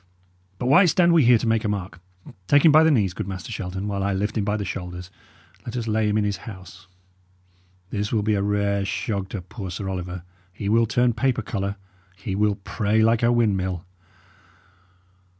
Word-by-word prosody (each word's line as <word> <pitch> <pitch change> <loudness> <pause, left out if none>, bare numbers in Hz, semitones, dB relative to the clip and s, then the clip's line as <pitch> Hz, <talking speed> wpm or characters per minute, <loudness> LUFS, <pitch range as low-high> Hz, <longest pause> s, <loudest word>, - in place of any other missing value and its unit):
But 125 - -4
why 145 +9 +6
stand 175 0 +4
we 160 -6 +5
here 120 0 +6
to 110 - -4
make 115 -1 +1
a - - -1
mark? 95 -4 -4 0.5
Take 145 +6 +4
him 160 - +8
by 155 +2 +7
the 160 - +5
knees, 105 - +2
good 90 - -5
Master 95 +2 -6
Shelton, 95 -2 -4
while 100 -1 -2
I 100 0 0
lift 105 +3 -2
him 110 - 0
by 105 +1 0
the 100 - -4
shoulders, 90 -1 -6 0.5
and - - -22
let 120 +1 -4
us 115 -2 -3
lay 110 -1 +1
him 105 - +1
in 105 - +2
his 100 -2 -1
house. 95 -2 -11 1.0
This 105 0 -2
will 110 -3 +1
be 110 +1 +1
a 100 - +1
rare 100 0 0
shog 100 0 -3
to 100 -4 -6
poor 95 +1 -8
Sir 95 +3 -5
Oliver; 90 -1 -5 0.3
he 100 +2 -5
will 115 +1 +3
turn 120 +1 +2
paper 120 0 0
colour; 100 -1 -3 0.4
he 95 +1 -5
will 105 0 +2
pray 105 +2 0
like 115 0 +3
a 120 0 +3
windmill." 95 -6 0
105 Hz, 205 wpm, -23 LUFS, 95-115 Hz, 1.0 s, him